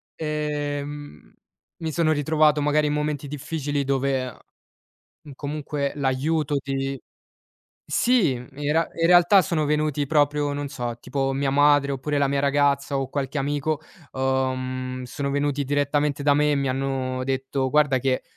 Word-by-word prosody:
ehm, 145 - -4 0.5
mi 160 - -2
sono 165 -1 +2
ritrovato 150 0 +3
magari 150 +1 +2
in 145 - 0
momenti 150 -1 -2
difficili, 145 -1 -3
dove 135 -1 0 1.0
uhm, 145 - -11
comunque 145 0 -3
l'aiuto 145 +2 0
di 135 -1 -3 0.9
sì, 235 - +3
in 125 0 -7 0.2
real 165 +1 +2
in 165 - +3
realtà 180 +2 +6
sono 155 -2 0
venuti 150 -1 0
proprio 145 -1 +1
non 145 0 -3
so, 120 -3 -4
tipo 135 +2 -2
mia 140 0 0
madre, 145 0 +4
oppure 145 +2 -2
la 140 -1 +2
mia 140 0 +1
ragazza 140 0 +1
o 135 -1 -3
qualche 140 0 -3
amico, 145 +2 -1 0.3
uhm, 130 -1 -2
sono 140 +3 -4
venuti 145 0 0
direttamente 145 +1 0
da 145 0 +4
me 150 +1 +3
e - - +3
mi 140 -1 0
hanno 130 -1 -2
detto: 135 0 -1
"Guarda 145 -3 +3
che, 130 0 0
145 Hz, 145 wpm, -24 LUFS, 135-150 Hz, 1.0 s, realtà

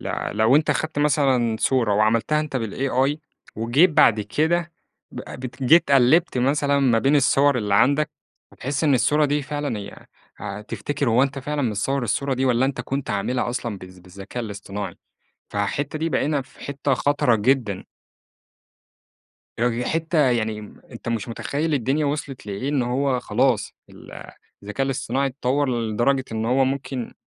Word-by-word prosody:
ل - - -5 0.3
لو 110 +6 +4
أنت 155 - +2
خدت 155 -1 -2
مثلًا 135 -6 +2
صورة 120 -6 +2
وعملتها 115 +8 +2
أنت 150 -3 -3
بالAI، 130 +5 0 0.4
وجيت 125 +11 +3
بعد 110 -7 +4
كده 165 +11 0 0.4
ب - - -7 0.2
بت 130 +1 -7
جيت 160 +4 +5
قلِّبت 135 +3 +4
مثلًا 140 +2 +2
ما 125 -4 +3
بين 135 +5 +3
الصوًر 140 0 +3
اللي 105 -3 0
عندك، 145 +8 +3 0.4
هتحس 140 +4 -3
إن 145 - +4
الصورة 150 +4 +3
دي 145 0 0
فعلًا 145 -5 -3
هي 100 - -10 0.3
هتفتكر 120 +7 -4
هو 115 +3 +4
أنت 140 0 -1
فعلًا 145 +1 -3
متصوَّر 125 +4 -1
الصورة 135 +3 -1
دي 130 - -1
والّا 125 -1 +2
أنت 135 0 -3
كنت 135 0 -4
عاملها 110 +6 -1
أصلًا 120 -4 -4
بالذ 95 0 -13
بالذكاء 95 +6 -8
الاصطناعي، 100 -1 -6 0.6
فحتّة 140 +9 -2
دي 165 +1 -1
بقينا 150 -2 0
في 130 - -18
حتّة 140 -1 -2
خطرة 145 -5 +2
جدًا. 110 -3 0 1.7
يعني 120 +1 0
حِتّة 165 +1 -1
يعني 110 -2 -1 0.3
أنت - - -7
مش 115 -3 -2
مُتخيِّل 150 +7 -2
الدنيا 140 +3 0
وصلت 140 -3 -4
لإيه 105 +6 -4
إن 145 -3 +1
هو 130 +1 0
خلاص 120 -1 0 0.2
ال - - -14 0.5
الذكاء 105 +7 -2
الإصطناعي 135 0 -1
اتَّطوَّر 135 +1 -1
لدرجة 120 +5 0
إن 110 0 -2
هو 130 +3 +3
ممكن 135 -2 -4
130 Hz, 155 wpm, -23 LUFS, 115-145 Hz, 1.7 s, جيت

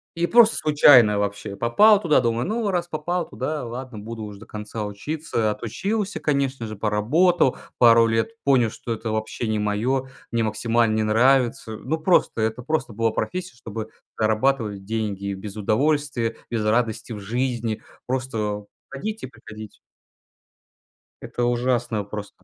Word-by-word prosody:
И 170 +1 0
просто 230 +1 +6
случайно 130 -8 +6
вообще 100 0 -3
попал 205 - +5
туда, 160 -5 +4
думаю: 120 -1 0
"Ну 220 0 -1
раз 175 -2 -1
попал 170 +2 -2
туда, 150 +3 -3
ладно, 120 -1 -7
буду 110 +1 -7
уж 105 -1 -7
до 110 - -13
конца 105 0 -6
учиться". 115 +2 -2
Отучился, 190 - -3
конечно 140 -5 -1
же, 110 - -6
поработал 125 - +2 0.2
пару 115 -1 +7
лет, 115 - 0
понял, 130 -5 +3
что 115 - -7
это 110 0 -3
вообще 110 +2 -3
не 110 -1 0
мое, 120 +6 0 0.2
мне 115 -1 +1
максимально 110 +1 +1
не 110 - +1
нравится. 120 +1 +2
Ну, 160 +8 -3
просто, 160 -8 +2
это 110 +2 -1
просто 155 -2 -1
была 115 +1 0
профессия, 180 +7 -4
чтобы 110 -2 -7 0.3
зарабатывать 110 -2 +1
деньги: 100 -2 -3
без 100 +1 -7
удовольствия, 120 +2 0
без 110 -2 -2
радости 115 +1 0
в 105 - -6
жизни. 120 +1 -2 0.2
Просто 110 -5 -2 0.2
ходить 215 +11 -5
и - - -3
приходить. 110 -3 -11 1.4
Это 120 - -4
ужасное 120 -2 0
просто. 105 -2 -8
115 Hz, 145 wpm, -23 LUFS, 110-140 Hz, 1.4 s, пару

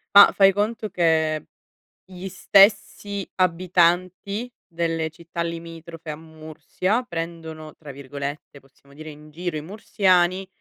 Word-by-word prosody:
Ma 200 - +11
fai 195 -1 +6
conto 210 +2 -2
che 160 -3 +1 0.6
gli 185 0 -8
stessi 200 +1 +3
abitanti 185 +5 +1
delle 165 -2 -2
città 170 +1 -8
limitrofe 165 -1 -7
a 150 - -5
Mursia 160 +7 -3
prendono 165 -2 -6
tra 150 -3 -11
virgolette, 140 +1 -7
possiamo 140 +1 -23
dire, 155 +2 -10
"in 150 0 -12
giro" 170 +1 -4
i 150 - -4
mursiani 185 0 +1
170 Hz, 120 wpm, -23 LUFS, 155-185 Hz, 0.6 s, Ma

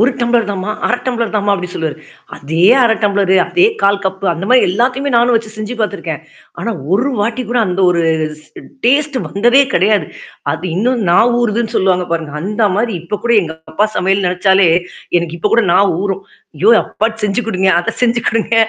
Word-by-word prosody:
1 235 +4 +4
tumbler 235 -2 +1
தாமா, 195 +1 -4 0.2
1/2 245 - +1
tumbler 235 -3 -2
தாமா 205 0 +1
அப்டின்னு 180 -1 -6
சொல்லுவாரு. 160 -2 -3 0.4
அதே 160 +4 -1 0.2
1/2 235 -2 +4
டம்ளரு 195 -2 +2
அதே 360 +2 +3 0.2
1/4 200 0 +2
கப்பு 190 +1 -3
அந்த 170 +3 -5
மதாரி 255 0 +5
எல்லாத்தையுமே 255 +7 0
நானும் 240 +1 +3
வச்சு 220 -1 -4
செஞ்சு 215 +3 -5
பார்த்துருக்கேன். 180 -8 -3 0.4
ஆனா 230 - -2 0.2
ஒரு 240 +8 +1
வாட்டி 235 +4 -2
கூட 245 - +1
அந்த 180 +1 -2
ஒரு 170 -1 +1 0.4
ஸ் - - -23 0.4
டேஸ்ட் 280 +2 +2
வந்ததே 240 +7 +3
கிடையாது. 205 +3 +2 0.5
அது 180 - -6
இன்னும் 240 +4 0
நான் 235 +7 +4
ஊறுதுன்னு 230 0 -1
சொல்லுவாங்க 180 -1 +1
பாருங்க. 160 -3 -3
அந்த 210 +3 0
மாரி 225 0 -1
இப்ப 205 +5 -4
கூட 235 0 +2
எங்க 160 -2 -5 0.2
அப்பா 205 +6 +2
சமையல் 195 +1 +1
நெனச்சாலே 190 +1 +3 0.5
எனக்கு 170 -1 -5
இப்ப 210 - -1
கூட 235 - +3
நா 180 - +4 0.2
ஊறும். 195 -1 -3 0.3
ஐயோ! 200 +9 +3
அப்பாட்டு 225 0 -3
செஞ்சு 210 +3 0
குடுங்க 190 -3 0
அத 225 - -3
செஞ்சு 240 -1 +2
கொடுங்க. 230 0 0
210 Hz, 185 wpm, -15 LUFS, 185-235 Hz, 0.5 s, மதாரி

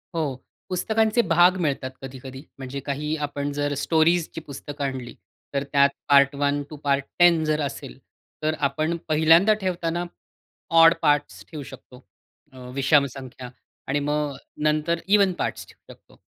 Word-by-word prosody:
हो, 150 -5 -1 0.3
पुस्तकांचे 220 +5 +1
भाग 175 +2 +5
मिळतात 135 -4 -2
कधी-कधी 130 0 -9
म्हणजे 135 0 -6
काही 150 +2 -2
आपण 145 0 -4
जर 145 0 -1
स्टोरीजची 165 +1 +1
पुस्तकं 145 0 -8
आणली 130 -3 -5 0.4
तर 140 0 0
त्यात 140 0 +5 0.2
पार्ट 140 0 +5
1 145 0 0
टू 155 - -8
पार्ट 140 -1 +1
10 175 -2 +5
जर 155 0 0
असेल 135 - -6 0.5
तर 155 0 +1
आपण 155 +4 -2
पहिल्यांदा 165 +7 +5
ठेवताना 175 -2 -2 0.8
ऑड 165 0 +8
पार्ट्स 145 -1 +1
ठेऊ 150 -3 -6
शकतो. 125 -1 -14 0.5
अ, - - -14 0.2
विषम 140 +1 +4
संख्या 130 -2 -9 0.4
आणि 140 +2 0
मग 145 0 -1 0.3
नंतर 155 +2 +1
इव्हन 200 -2 +4
पार्ट्स - - -3
ठेवू - - -16
शकतो. - - -24
150 Hz, 145 wpm, -24 LUFS, 140-165 Hz, 0.8 s, ऑड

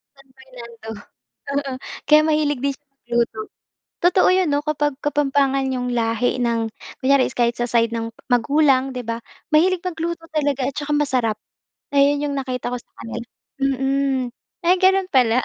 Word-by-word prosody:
San 275 0 -20
Fernando, 235 -4 -11 0.7
oo. 280 -2 -1 0.4
Kaya 305 0 +8
mahilig 300 -4 +1
din 280 0 0
siya 290 - -47
magluto. 235 -4 -2 0.6
Totoo 365 +1 +5
'yon 370 -2 +3
'no, 285 - +2
kapag 295 -1 0
Kapampangan 275 -2 +1
'yong 250 -1 -2
lahi 230 +2 +1
ng 230 -1 0 0.3
kunyari 270 0 +4
is - - -10
kahit 235 0 +2
sa 240 - -1
side 230 -1 +2
ng 230 0 -4 0.2
magulang, 265 +2 +3
'di 250 - -4
ba, 230 0 -3 0.3
mahilig 360 +3 +4
magluto 330 -1 -4
talaga 285 -4 0
at 275 - -5
tsaka 295 0 -3
masarap. 260 -7 +1 0.6
Ayon 285 +1 +3
'yong 285 - -1
nakita 255 -2 -3
ko 250 - -2
sa - - -28
kanila. 235 0 -6 0.3
Mm. 270 -1 0 0.3
Ay 360 +2 +5
gano'n 380 0 +4
pala. 250 -2 +4
275 Hz, 160 wpm, -21 LUFS, 245-295 Hz, 0.7 s, Kaya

